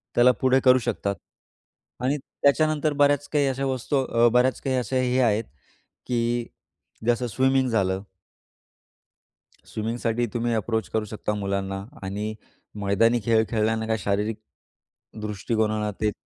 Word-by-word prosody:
त्याला 125 +1 +6
पुढे 130 0 +4
करू 130 0 +7
शकतात. 100 0 -2 0.9
आणि 140 +3 +1
त्याच्यानंतर 150 +2 +1
बऱ्याच 145 0 +2
काही 145 -2 +3
अशा 135 +1 -1
वस्तू 130 +2 -2
अ, 115 -1 +3
बऱ्याच 125 +1 +3
काही 130 -1 -1
अशा 125 +1 -2
हे 130 0 +1
आहेत, 115 -2 +2 0.6
की 120 -1 0 0.6
जसं 120 +1 +2
स्विमिंग 130 +3 +2
झालं. 95 -4 +1 1.7
स्विमिंगसाठी 115 +2 -1
तुम्ही 120 0 0
अप्रोच 110 0 -1
करू 110 -1 -1
शकता 105 0 -3
मुलांना. 100 -1 -3 0.2
आणि 105 +3 -3 0.5
मैदानी 115 +5 +3
खेळ 110 -1 +4
खेळल्याने 110 0 0
काही 110 0 0
शारीरिक 105 +2 -1 0.8
दृष्टिकोनाला 105 +1 -1
ते 105 -1 +2
115 Hz, 125 wpm, -25 LUFS, 105-130 Hz, 1.7 s, करू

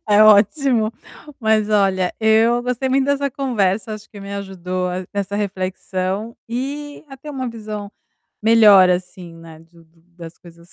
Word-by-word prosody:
É 210 +1 +6
ótimo, 220 +2 +4 0.5
mas, 220 -1 +2
olha, 195 -3 +1
eu 225 +2 +3
gostei 250 +1 -2
muito 265 +1 +2
dessa 280 0 0
conversa, 215 -6 -1
acho 215 - -12
que 205 - -11
me 200 0 -8
ajudou 185 -2 -4 0.2
nessa 200 0 -3
reflexão 190 +1 -3
e 285 +5 -5
a 270 - -11
ter 295 +3 -10
uma 260 -3 -4
visão 215 -3 -7 0.5
melhor, 215 -4 +6
assim, 180 -1 -4
né, 165 -1 -13
de 165 +1 -21
do 165 0 -29
das 165 -1 -11
coisas 170 0 -17
210 Hz, 150 wpm, -19 LUFS, 185-235 Hz, 0.5 s, É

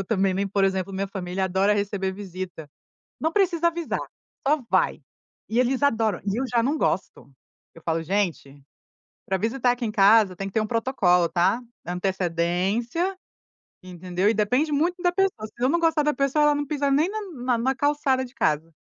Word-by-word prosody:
eu - - -3
também 195 -4 +1
nem 195 +1 -1
por 195 0 +1
exemplo, 190 0 -1
minha 195 +1 -2
família 190 -1 -3
adora 190 +3 +2
receber 200 -2 -1
visita. 185 -5 -7 0.5
Não 320 - 0
precisa 345 -4 +2
avisar, 335 -1 -3 0.5
só 300 0 +2
vai, - - +1 0.5
e 225 - -1
eles 255 +2 +1
adoram. 225 -8 +1
E 200 +1 0
eu - - 0
já 240 -2 +1
não 290 +6 0
gosto. 180 - -2 0.4
Eu 165 - -15
falo: 165 0 -1
"Gente, 165 -7 -2 0.7
para 190 - 0
visitar 240 +5 +1
aqui 245 -1 -3
em 215 - -2
casa 205 -2 +5
tem 195 - -4
que 195 - -9
ter 220 - +2
um 215 - -2
protocolo, 205 -8 +2
tá, 175 +8 +2 0.3
antecedência, 190 - -1 0.7
entendeu." 180 +2 -1
E - - +3
depende 250 +9 +1
muito 345 +5 0
da 355 - +3
pessoa, 360 - 0
se - - -24
eu 255 - +4
não 340 +3 +2
gostar 325 -2 +2
da 300 0 +2
pessoa, 275 +2 +1
ela 295 0 +4
não 290 0 -2
pisa 285 -1 0
nem 305 +6 +3
na 435 +1 -4
na 250 -3 -1
na 265 +3 0
calçada 285 -2 +1
de 250 - -16
casa. 155 +2 0
215 Hz, 190 wpm, -24 LUFS, 190-285 Hz, 0.7 s, casa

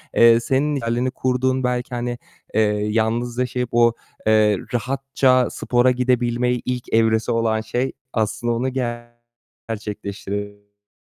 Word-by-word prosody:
eee, 115 0 +7
senin 140 +5 0
idealini 120 0 -1
kurduğun 130 0 0
belki 125 0 -1
hani, 120 0 -3 0.4
eee, 110 - +3 0.3
yalnız 115 +2 0
yaşayıp 125 -1 -1
o, 120 -1 +4 0.3
eee, 110 -2 +4 0.2
rahatça 130 +1 +2
spora 125 +1 +2
gidebilme 125 -1 +1
ilk 125 0 -4
evresi 110 0 +3
olan 115 -1 +1
şey 120 +4 -2 0.2
aslında 115 +2 0
onu 125 +3 -1 1.0
gerçekleştirebilirsin. 100 -1 -6
120 Hz, 115 wpm, -21 LUFS, 110-125 Hz, 1.0 s, eee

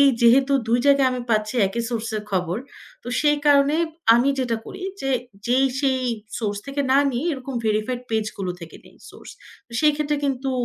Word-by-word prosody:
এই 280 - +7
যেহেতু 260 +4 +5 0.2
২ 240 +1 +3
জায়গায় 280 -2 +5
আমি 250 - -3
পাচ্ছি 215 +1 0
একই 235 +5 -3
সোর্সের 220 -2 -3
খবর। 180 -1 -1 0.5
তো - - -8
সেই 295 0 +3
কারণে 285 +1 +5 0.4
আমি 245 +4 +3
যেটা 240 -3 0
করি 380 0 -9 0.2
যে 270 - -2 0.4
যেই 260 +3 +3
সেই 265 -2 +1 0.4
সোর্স 205 -3 -2
থেকে 275 +1 -3
না 270 - +5
নিয়ে, 255 +5 -2
এরকম 265 -1 -6
ভেরিফাইড 215 +4 -1
পেজগুলো 215 -4 -2
থেকে 165 -1 -10
নেই - - -19
সোর্স। - - -13 0.4
তো 235 - -20
সেই 305 -1 +5
ক্ষেত্রে 300 -1 -1
কিন্তু 270 -1 -1
255 Hz, 180 wpm, -22 LUFS, 220-275 Hz, 0.5 s, এই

